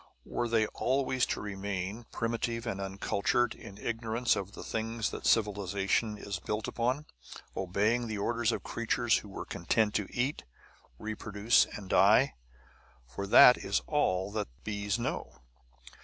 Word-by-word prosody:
Were 120 - -2
they 115 -1 +3
always 130 -1 0
to - - -2
remain, 100 +2 -4
primitive 115 0 -2
and 100 -4 -3
uncultured, 100 +4 0
in 100 -3 -11
ignorance 115 +2 0
of 100 0 -5
the - - -8
things 115 0 -2
that - - -4
civilization 105 0 +1
is 100 -3 -5
built 105 +3 -3
upon, 130 +5 -1 0.5
obeying 105 +6 +1
the 110 -1 -3
orders 115 +3 +1
of - - -3
creatures 115 0 +1
who 105 - -8
were 95 - -6
content 105 +5 0
to 105 - -1
eat, 130 +4 -1 0.5
reproduce, 110 - +2
and 100 -3 -9
die? - - +5 0.7
For 80 +11 -6
that 125 +4 +8
is 100 - -1
all 95 -10 +1
that 105 -1 -2 0.2
bees 105 0 -1
know! 115 - -4
110 Hz, 140 wpm, -31 LUFS, 100-115 Hz, 0.7 s, that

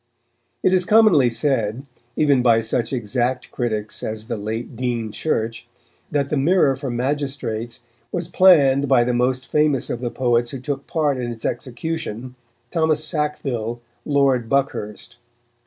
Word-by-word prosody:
It 185 - +3
is 185 -1 +4
commonly 195 - +5
said, 120 -1 0 0.3
even 140 -4 +3
by 115 -2 +4
such 115 +1 0
exact 125 +1 -1
critics 110 -3 -2
as 110 0 -5
the - - -3
late 110 +3 -5
Dean 120 -2 -2
Church, 115 -4 -2 0.4
that 140 -1 -1
the 150 - 0
Mirror 140 -1 +3
for 135 -1 -5
Magistrates 125 -3 -2 0.3
was 175 -2 -2
planned 145 -7 +5
by 130 -2 +4
the 125 +1 0
most 125 +1 0
famous 150 -4 +1
of 120 - -4
the 120 - -2
poets 120 -1 +1
who 135 - -6
took 140 +1 -4
part 150 -4 0
in 120 -1 -3
its 115 -1 -7
execution, 125 -1 -4 0.4
Thomas 160 -2 +1
Sackville, 135 -7 -2 0.2
Lord 135 -5 +1
Buckhurst. 125 -6 -2
130 Hz, 145 wpm, -21 LUFS, 120-145 Hz, 0.4 s, commonly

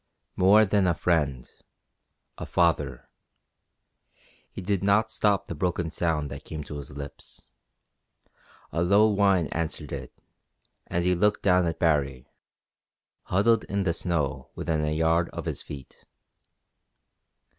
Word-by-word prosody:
More 105 +4 +6
than 100 -1 +2
a 85 - +2
friend; 75 -8 0 0.9
a - - -7
father. 85 -7 0 1.4
He - - -8
did 95 0 -1
not 105 +2 +3
stop 105 -3 +1
the - - -6
broken 85 0 -2
sound 80 -5 -1
that - - -8
came 80 -1 -6
to 75 - -7
his 70 -3 -8
lips. 70 0 -9 1.3
A 85 - -1
low 100 +5 +5
whine 100 -4 +3
answered 80 -3 -3
it, 65 -3 -6 0.8
and 85 0 -1
he 90 - +3
looked 105 +4 +1
down 90 -2 +4
at 80 -1 -2
Baree, 70 -6 0 1.0
huddled 110 +4 +2
in 100 0 -1
the 85 -3 +1
snow 80 -6 -2
within 80 -2 -1
a 75 - 0
yard 80 +2 +2
of - - -6
his - - -3
feet. 70 -3 -11
85 Hz, 135 wpm, -26 LUFS, 75-100 Hz, 1.4 s, More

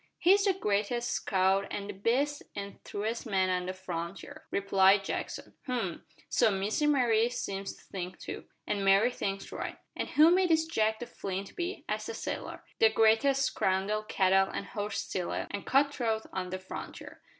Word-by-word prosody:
"He's 390 +3 +5
the 390 - +4
greatest 235 - 0
scout 190 0 +1
an' 200 - -3
the 205 - -6
best 255 +9 0
an' 200 0 -6
truest 225 +4 -3
man 190 -3 +2
on 180 0 -1
the 185 - -2
frontier," 185 - -6
replied 195 0 +4
Jackson. - - -4
"H'm! 235 -9 -2 0.2
so - - +3
Miss 200 +5 -1
Mary 245 -6 +3
seems 195 -5 -4
to - - -19
think 185 -1 -6
too." - - -7 0.2
"An' 200 -1 -1
Mary 195 +5 +5
thinks 195 -4 -4
right." - - -5 0.2
"An' - - -2
who 315 +3 +6
may 370 0 +4
this 320 -1 +3
Jake 220 -8 +1
the 240 - -6
Flint 195 -3 -5
be?" 360 +3 -4
asked - - -2
the 455 - -4
sailor. - - -5 0.2
"The 225 - +7
greatest 225 +5 +4
scoundrel, 195 -3 +1
cattle 195 -2 +3
and - - -4
horse 205 -2 -3
stealer, 180 -2 -3
and 205 - -5
cut 280 +1 +3
throat 225 -4 -1
on 185 -1 -3
the 185 - -3
frontier." 185 0 -9
205 Hz, 175 wpm, -30 LUFS, 195-250 Hz, 0.2 s, The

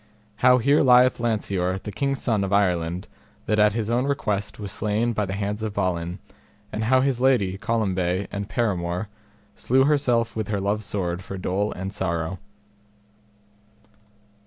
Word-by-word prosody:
How 125 +2 +5
here 140 +5 +3
lieth 125 -1 +5
Lanceor 100 -5 -1
the 105 +2 -7
king's 140 +5 -1
son 110 -5 0
of 95 - -3
Ireland, 90 -2 +1 0.4
that 105 0 +1
at 105 0 +5
his 110 0 -2
own 125 +2 +1
request 105 -9 -2
was 100 -2 -5
slain 110 +3 0
by 105 -2 -1
the 95 - -3
hands 105 +1 -3
of 110 -2 -4
Balin; 90 -2 -1 0.6
and 110 - -2
how 130 +2 +4
his 130 -2 0
lady, 120 -8 +3
Colombe, 95 -4 0
and 100 0 -4
paramour, 95 -4 -1 0.5
slew 130 +2 +2
herself 125 -5 +1
with 110 -2 -2
her 105 -1 -1
love's 100 +2 -1
sword 90 -2 -2
for 95 - -7
dole 95 +3 -1
and 95 +2 -5
sorrow. 85 -2 -2
105 Hz, 160 wpm, -24 LUFS, 95-115 Hz, 0.6 s, How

